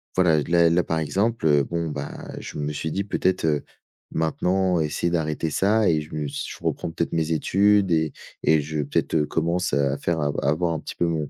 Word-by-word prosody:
voilà, 80 -5 +4
là, 85 0 +4
là, 85 +1 +3
par 80 0 -1
exemple, 100 +7 0
heu, 75 -1 +4
bon, 85 +2 -3
bah, 75 -1 -6
je - - -8
me 75 0 -2
suis 75 +2 -3
dit: 100 - -1
«Peut-être, 95 -3 0
heu, 75 -2 +1 0.5
maintenant, 90 +3 +1
essayer 75 +2 0
d'arrêter 80 -1 -1
ça 105 +6 +2
et 80 -2 +2
je 75 - -11
me 75 -1 -2
s 70 - -4
je - - -8
reprends - - -2
peut-être 85 - -2
mes 80 0 0
études 100 +5 +3
et 80 -2 +1 0.3
et 80 -1 +4
je, 75 +1 -3
peut-être, 70 - -1
heu, 75 -2 +3
commence 85 +4 -1
à 70 0 +1
faire 85 -1 -1
à 70 -1 +1
à - - +2
avoir 85 +2 +1
un 80 - -2
petit - - -7
peu 85 - +1
mon 80 -4 -2
80 Hz, 225 wpm, -24 LUFS, 75-90 Hz, 0.5 s, voilà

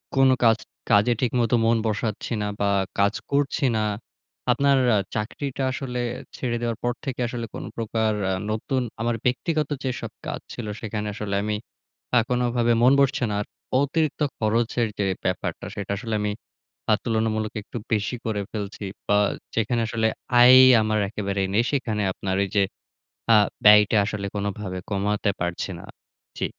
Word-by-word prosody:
কোন 135 0 +5
কাজ 115 -1 +5 0.3
কাজে 105 +4 +5
ঠিকমতো 120 -2 +2
মন 115 0 +4
বসাচ্ছি 110 +1 -2
না 105 - -1
বা 100 - +1 0.3
কাজ 100 +1 +3 0.2
করছি 140 +1 +1
না। 110 - +1 0.7
আপনার 140 +2 +3 0.2
আ - - +4 0.2
চাকরিটা 135 +5 -3
আসলে 130 -2 -4 0.4
ছেড়ে 120 -2 -2
দেওয়ার 115 -2 -1
পর 120 0 +1
থেকে 135 -3 -4
আসলে 120 -1 -4
কোন - - -5
প্রকার 110 -1 0 0.2
আ - - +1 0.2
নতুন 130 +4 -1 0.2
আমার 120 0 0
ব্যক্তিগত 150 +4 0
যেসব 130 -2 -3
কাজ - - -3
ছিল 120 - -6 0.2
সেখানে 105 -1 -3
আসলে 100 -1 -3
আমি 105 0 -1 0.6
আ - - +7
কোনভাবে 120 -1 +1
মন 125 - +6
বসছে 135 -2 +2
না - - -1
আর। - - -4 0.4
অতিরিক্ত 155 +1 0 0.2
খরচের 115 +1 +1
যে 100 - 0 0.2
ব্যাপারটা - - -2
সেটা 100 -1 -4
আসলে 110 +2 -3
আমি 105 0 0 0.6
আ - - +7
তুলনামূলক 110 -2 -1
একটু 110 - -8 0.2
বেশি 105 +3 0
করে 110 -3 -1
ফেলছি। 105 -1 -5 0.2
বা 105 - +4 0.4
যেখানে 115 +1 +1
আসলে 110 0 +1 0.3
আয়ই 130 +1 +9 0.2
আমার 110 0 +1
একেবারে 100 -2 -2
নেই, 115 +3 +4
সেখানে 115 -7 -1
আপনার 95 0 -3
ওই - - -2
যে 100 - +5 0.7
আ - - +8 0.3
ব্যয়টা 105 +1 +7
আসলে 100 -1 -3
কোনভাবে 100 -2 -3
কমাতে 105 +1 0
পারছি 85 0 -2
না। - - -10 0.5
জি। - - -1
110 Hz, 160 wpm, -24 LUFS, 105-125 Hz, 0.7 s, আয়ই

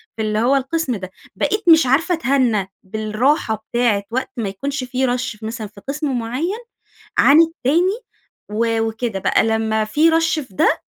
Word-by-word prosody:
في 225 - -4
اللي 215 0 0
هوّ 250 +5 +3
القسم 275 0 -1
ده، 185 -2 -7 0.2
بقيت 420 +1 -1
مش 320 -2 +7
عارفة 320 +8 +2
أتهنى 250 - +1
بالراحة 220 - -1
بتاعة 235 -4 +1
وقت 260 +2 -2
ما 215 -4 -2
يكونش 275 +8 -4
في 255 +1 -1
rush 235 -3 -6
مثلًا 220 0 -5
في 200 0 -16
قسم 280 -3 -2
معيّن 290 - -3 0.6
عن 295 +4 +7
التاني، 330 - +1 0.5
و 225 +1 0
وكده 225 -2 -2
بقى، - - +2
لمّا 220 -1 0
في 305 +9 +3
rush 325 -1 +1
في 190 - -22
ده، - - +2
245 Hz, 165 wpm, -19 LUFS, 220-295 Hz, 0.6 s, مش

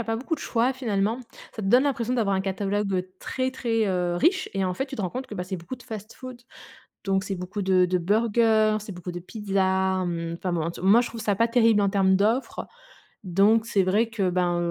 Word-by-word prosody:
a 235 - -3
pas 225 +1 -1
beaucoup 275 +7 -2
de - - -10
choix, 245 +2 +1
finalement. 225 -2 -1 0.3
Ça 220 - -6
te - - -3
donne 250 +6 +5
l'impression 250 -4 -1
d'avoir 205 -5 +1
un 190 - +1
catalogue 195 -1 -1
très, 260 0 -2
très, 225 -4 0
heu, 180 -2 0
riche 360 - +2
et 195 -1 -1
en 180 -1 -1
fait, 270 - -2
tu 270 -1 -8
te 210 - -3
rends 180 - -2
compte 260 +1 -5
que 210 - -7
bah, 180 - -3
c'est 185 +1 -4
beaucoup 175 +10 -8
de 245 - -16
fast-food. 240 +2 -9 0.6
Donc 195 0 0
c'est 195 - -3
beaucoup 185 +3 -5
de 185 -1 +3
de 180 0 +1
burgers, 215 +2 +2
c'est 210 -1 -8
beaucoup 180 0 -7
de 175 - -5
pizzas, 190 -1 0
mmh. 170 -1 -3
Enfin 180 -2 -3
bon, 170 - 0
en 165 - -2
tout 170 - -10
moi, 210 +5 +6
je 245 - -2
trouve 230 - -8
ça 210 -2 +1
pas 230 +3 +2
terrible 230 -3 +4
en 200 - +2
termes 190 -1 +3
d'offres. 225 +7 0 0.6
Donc 200 +5 +3
c'est 195 -2 +2
vrai 210 +5 +1
que 200 -5 0
ben, 175 -1 +1
205 Hz, 240 wpm, -25 LUFS, 185-230 Hz, 0.6 s, moi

